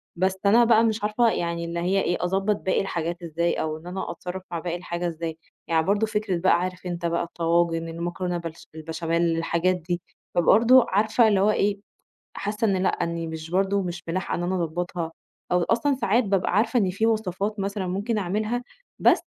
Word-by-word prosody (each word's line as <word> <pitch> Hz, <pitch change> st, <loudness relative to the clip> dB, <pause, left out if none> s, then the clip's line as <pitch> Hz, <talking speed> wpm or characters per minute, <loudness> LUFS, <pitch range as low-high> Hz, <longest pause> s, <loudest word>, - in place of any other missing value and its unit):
بس 190 Hz, +2 st, +1 dB
أنا 225 Hz, +4 st, +6 dB
بقى 225 Hz, -1 st, +5 dB
مش 220 Hz, -2 st, 0 dB
عارفة 215 Hz, +3 st, +3 dB
يعني 170 Hz, -4 st, -2 dB
اللي 170 Hz, 0 st, -3 dB
هي 190 Hz, +3 st, +1 dB
إيه 175 Hz, -, 0 dB
أضبط 195 Hz, +3 st, +1 dB
باقي 190 Hz, -, 0 dB
الحاجات 175 Hz, -2 st, -3 dB
إزاي 170 Hz, +1 st, 0 dB
أو 155 Hz, 0 st, -2 dB
إن 165 Hz, +3 st, -13 dB
أنا 185 Hz, -1 st, -4 dB
أتصرّف 180 Hz, +2 st, -6 dB
مع 170 Hz, -, -2 dB
باقي 175 Hz, 0 st, -3 dB
الحاجة 175 Hz, 0 st, -3 dB
إزاي، 165 Hz, -1 st, -4 dB, 0.3 s
يعني 160 Hz, -1 st, +2 dB
برضه 205 Hz, +3 st, +2 dB
فكرة 210 Hz, -4 st, -1 dB
بقى 185 Hz, +2 st, +3 dB
عارف 185 Hz, 0 st, -4 dB
أنت 175 Hz, -1 st, -4 dB
بقى 170 Hz, 0 st, 0 dB
الطواجن، 165 Hz, 0 st, 0 dB
المكرونة 175 Hz, +2 st, -3 dB
بالـ– 165 Hz, -1 st, -6 dB, 0.2 s
بالبشاميل، 165 Hz, +1 st, -1 dB
الحاجات 170 Hz, +2 st, +1 dB
دي، 175 Hz, 0 st, -3 dB, 0.3 s
فبرضه 230 Hz, +9 st, +6 dB
عارفة 220 Hz, +4 st, +3 dB
اللي 205 Hz, -3 st, +3 dB
هو 205 Hz, +2 st, +4 dB
إيه، 200 Hz, -1 st, +1 dB, 0.6 s
حاسّة 210 Hz, +2 st, -2 dB
إن 195 Hz, -2 st, +2 dB
لأ، -, -, +3 dB
إنّي 170 Hz, 0 st, -2 dB
مش 160 Hz, 0 st, -6 dB
برضه 195 Hz, +2 st, +2 dB
مش 175 Hz, -1 st, -5 dB
ملاحقة 180 Hz, +3 st, -2 dB
إن 175 Hz, -, -3 dB
أنا 180 Hz, +2 st, 0 dB
أضبطها، 170 Hz, 0 st, -3 dB, 0.4 s
أو 180 Hz, 0 st, +3 dB
أصلًا 255 Hz, +8 st, +1 dB
ساعات 240 Hz, -1 st, +2 dB
بابقى 195 Hz, -2 st, 0 dB
عارفة 235 Hz, +4 st, +3 dB
إن 195 Hz, -4 st, +2 dB
في 200 Hz, +5 st, 0 dB
وصفات 210 Hz, -1 st, -1 dB
مثلًا 195 Hz, -1 st, -2 dB
ممكن 205 Hz, +5 st, -1 dB
أعملها، 215 Hz, +5 st, -1 dB, 0.4 s
بس -, -, +5 dB
180 Hz, 190 wpm, -25 LUFS, 170-205 Hz, 0.6 s, أنا